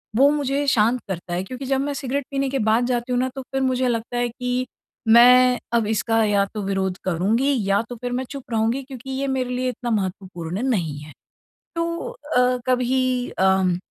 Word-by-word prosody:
वो 275 +5 +6
मुझे 285 -1 0
शांत 235 -1 +3
करता 175 -1 -5
है, 180 +1 -1
क्योंकि 255 +7 -7
जब 270 0 +1
मैं 285 +1 -2
सिगरेट 275 0 -3
पीने 275 -1 0
के 270 0 -1
बाद 230 +3 +3
जाती 245 0 -1
हूँ 245 - +2
ना, 260 +1 0
तो 270 - -4
फिर 270 +1 -4
मुझे 260 -1 +1
लगता 235 0 -2
है 240 0 0
कि 250 +1 -2 0.4
मैं 250 +2 +7
अब 230 -3 +2
इसका 225 +1 +1
या 200 -1 +2
तो 215 - -3
विरोध 190 -1 -1
करूँगी 215 +11 +1
या 200 +2 +3
तो 245 - -6
फिर 245 0 -3
मैं 250 +1 -1
चुप 275 -2 -6
रहूँगी, 230 +4 0
क्योंकि 265 -1 -10
ये 270 +1 -2
मेरे 255 -1 -1
लिए 255 +1 -1
इतना 245 0 -5
महत्वपूर्ण 185 -2 -3
नहीं 165 - -1
है। 150 0 -11 0.6
तो 335 0 0 0.5
अ, 250 0 +4
कभी 255 0 +1
अम, 190 -2 +3
245 Hz, 200 wpm, -22 LUFS, 210-260 Hz, 0.6 s, मैं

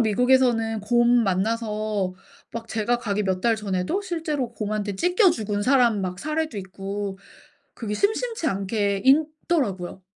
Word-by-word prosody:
미국에서는 230 -1 +3
곰 240 +3 +3
만나서 210 -1 -1 0.4
막 230 0 -6
제가 225 +3 0
가기 210 -3 -1
몇 185 -1 0
달 230 +2 +2
전에도 200 - -1
실제로 310 - -3
곰한테 210 -2 -3
찢겨 360 - +4
죽은 210 -7 -2
사람 240 -3 +3
막 180 -1 -4
사례도 310 -1 -2
있고 195 +1 -5 0.6
그게 215 -3 -4
심심치 435 - 0
않게 200 -3 0
있더라고요. 270 - +1
220 Hz, 290 characters per minute, -24 LUFS, 200-265 Hz, 0.6 s, 찢겨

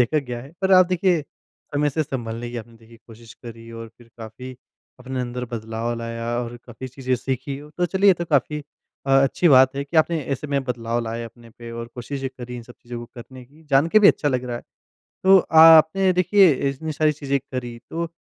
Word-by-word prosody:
देखा 125 +6 +2
गया 125 -4 -5
है। 140 +5 -14
पर 190 0 +2
आप 185 -1 +7
देखिए 180 -3 +1 0.5
समय 145 0 +1
से 155 +3 -1
सँभलने 120 -4 -5
की 120 - -7
आपने 115 0 -9
देखिए 115 0 -18
कोशिश 115 0 -14
करी 115 0 -10
और 115 0 -8
फिर 120 - -18
काफ़ी 120 +3 -9 0.4
अपने 130 0 -5
अंदर 125 0 -4
बदलाव 115 +1 -3
लाया 115 0 -5
और 120 0 -5
काफ़ी 125 +2 -9
चीज़ें 130 0 -2
सीखी, 135 +2 -4 0.2
तो 175 - +2
चलिए 195 +3 +2
ये - - +4
तो 170 - -4
काफ़ी 150 -1 0 0.5
अ, - - -1
अच्छी 165 +5 +2
बात 130 -1 +6
है 140 - -2
कि 155 +4 -5
आपने 160 +1 +3
ऐसे 135 +2 -4
में 140 -1 -1
बदलाव 120 -2 -2
लाए 115 +1 -4
अपने 115 0 -14
पे 115 +1 -11
और 115 0 -6
कोशिशें 135 +2 -5
करी 125 0 -7
इन 120 - -8
सब 120 +1 -15
चीज़ों 120 0 -7
को - - -7
करने 125 +1 -11
की, 145 +6 -22
जान 140 +3 +4
के 215 - +5
भी 205 - +7
अच्छा 145 - +2
लग 130 -2 -1
रहा 120 -1 -4
है। - - -9 0.6
तो 190 0 +7 0.2
आपने 165 +4 +7
देखिए 185 +1 +5 0.2
इतनी 155 +4 -5
सारी 155 +1 +2
चीज़ें 140 -2 -2
करी 125 -3 -7
तो 170 +1 -3
130 Hz, 215 wpm, -22 LUFS, 120-155 Hz, 0.6 s, आप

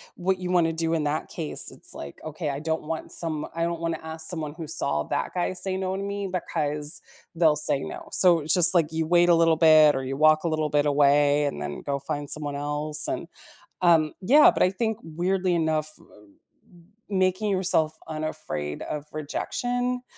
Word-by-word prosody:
what 185 +1 -1
you 180 0 -3
wanna 165 -2 +2
do 165 0 -1
in 155 -2 0
that 150 +2 -2
case, 160 -3 -5
it's - - -8
like, 70 - -9
okay, 155 0 -4
I 140 0 -3
don't 160 +1 -2
want 160 +1 -5
some 155 -3 -3
I 165 - -1
don't 170 -1 -2
wanna 165 -1 -2
ask 160 0 -6
someone 155 -4 -4
who 165 -3 -7
saw 75 - -1
that - - -3
guy 180 0 -1
say 190 0 -3
no 190 0 -2
to 195 - -4
me, 200 0 -3
because 150 -4 -2 0.3
they'll 160 -3 +3
say 145 -2 0
no. - - -8
So, 175 -3 +5
it's 150 +1 0
just, 175 -1 +6
like, 165 -3 +2
you 160 0 -2
wait 175 0 +4
a 170 - +6
little 165 -1 +4
bit 155 -2 +6
or 135 - -2
you 135 +1 -4
walk 155 +1 +4
a 170 - 0
little 155 -1 -1
bit 145 0 +2
away 145 0 +3
and 75 - -3
then 75 0 -5
go 140 -1 -2
find 145 +1 -5
someone 145 -2 -1
else, 150 +1 -1
and 170 - -3 0.5
um, 165 -3 +4
yeah, 285 +11 +6
but - - +1
I - - +4
think, 220 +3 -2
weirdly 180 +3 -1
enough, 155 -2 0
m - - -19 1.1
m 190 - 0
making 185 +3 -1
yourself 160 -4 +1
unafraid 155 - -5
of 150 -1 -5
rejection 245 - -3
160 Hz, 200 wpm, -25 LUFS, 150-175 Hz, 1.1 s, just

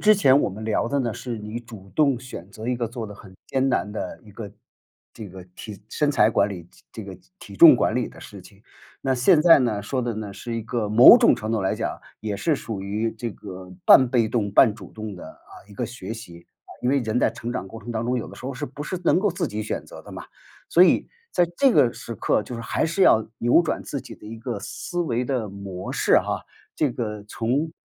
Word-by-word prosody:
之 215 0 +6
前 140 -9 +5
我 - - +1
们 105 +3 -8
聊 110 +1 0
的 140 +3 0
呢， 120 -4 -1
是 120 0 -6
你 105 +2 -6
主 110 -5 -13
动 140 -5 +3
选 120 -7 -9
择 110 +2 -9
一 125 - 0
个 120 -1 -2
做 115 -1 -6
得 105 - -10
很 95 -2 -15
艰 135 0 0
难 105 -5 0
的 105 - -6
一 110 - -16
个 105 0 -8 0.6
这 110 -3 -9
个 95 0 -11
体 105 -3 -9
身 145 +3 +1
材 110 -6 +4
管 105 -2 +2
理 90 -4 -8 0.3
这 - - -7
这 - - -10
个 - - -9 0.2
体 - - -12
重 - - +10
管 - - +1
理 - - -1
的 - - -15
事 100 - -11
情。 100 +3 -18 0.4
那 135 -1 0
现 150 +6 +4
在 165 -2 +8
呢， 110 -6 0
说 130 +5 -2
的 120 -2 -2
呢， 105 -2 -6
是 120 +3 -6
一 115 - -3
个 115 -1 -2
某 110 +4 +9
种 - - +5
程 110 - -5
度 110 - 0
来 95 - 0
讲 - - -4 0.2
也 105 -2 -3
是 160 +8 +1
属 110 -6 -6
于 105 +4 -2
这 115 +1 -5
个 95 -2 -10
半 130 -2 +7
被 120 -3 +2
动 105 -4 -1
半 110 0 +5
主 100 -5 -13
动 110 -2 -7
的， 90 - -10
啊， - - -22 0.2
一 105 - -14
个 120 - -2
学 115 -3 -7
习。 85 -7 -12 0.2
啊， - - -17
因 125 - 0
为 140 0 +2
人 110 0 -1
在 - - +2
成 115 +1 -6
长 125 -6 -4
过 115 +3 -10
程 120 - -7
当 115 0 -2
中， 125 - 0
有 120 - -3
的 - - -12
时 - - -12
候 135 - -4
是 - - -4
不 140 +4 -8
是 180 +4 -4
能 - - +4
够 205 +2 +1
自 175 - -2
己 105 +1 -4
选 110 - -4
择 - - -12
的 - - -12
嘛。 - - -8 0.5
所 175 - +6
以 - - +2 0.2
在 175 - +3
这 275 -2 +5
个 120 - +4
时 115 - -8
刻， 105 - 0
就 125 - -8
是 115 - -5
还 120 - -1
是 170 +4 0
要 110 -10 +5
扭 120 +8 +4
转 - - -2
自 140 - -5
己 - - -11
的 - - -17
一 115 +1 -8
个 115 -2 -4
思 175 - -5
维 125 -7 -1
的 120 -6 -2
模 95 -2 -7
式 - - +2
哈 - - -3 0.3
这 150 - +1
个 105 -4 -4
从 125 +9 -1
115 Hz, 275 characters per minute, -24 LUFS, 105-125 Hz, 0.6 s, 重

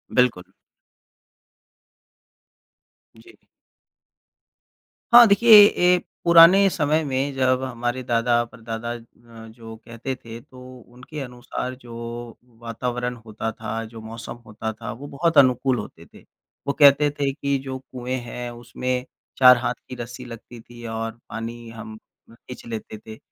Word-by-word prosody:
बिल्कुल। 125 -8 +2 2.7
जी। - - -18 1.8
हाँ, 240 -1 +10
देखिए 225 +3 +4 0.2
ए 180 -2 +3 0.3
पुराने 170 +4 +7
समय 155 -1 0
में 135 0 -2
जब 130 -1 +1
हमारे 120 0 -3
दादा-परदादा 120 -1 -1
अ, 115 -1 -14
जो 115 0 -12
कहते 120 +3 -6
थे 115 0 -9
तो 130 +1 -17 0.3
उनके 125 +5 -10
अनुसार 125 0 -6
जो 120 -2 -13 0.7
वातावरण 125 +1 -4
होता 110 0 -6
था, 110 +1 -5
जो 110 0 -11
मौसम 115 +1 -8
होता 110 +1 -5
था - - -5
वो 140 +5 -9
बहुत 160 +3 -1
अनुकूल 130 -1 +4
होते 85 -5 -10
थे। - - -18 0.4
वो 140 - +1
कहते 145 +1 +6
थे 140 -1 +1
कि 140 -1 -1
जो 130 0 -4
कुएँ 130 -1 -6
हैं 120 0 -7
उसमें 125 +2 -4 0.3
4 125 -1 +8
हाथ 125 - -2 0.2
की 125 - -6
रस्सी 120 +1 -8
लगती 115 0 -11
थी 120 0 -13
और 115 0 -3 0.2
पानी 115 +1 -7
हम 110 -1 -10 0.3
खींच 125 +2 -12
लेते 110 -1 -7
थे, 110 +1 -12
120 Hz, 130 wpm, -23 LUFS, 115-130 Hz, 2.7 s, हाँ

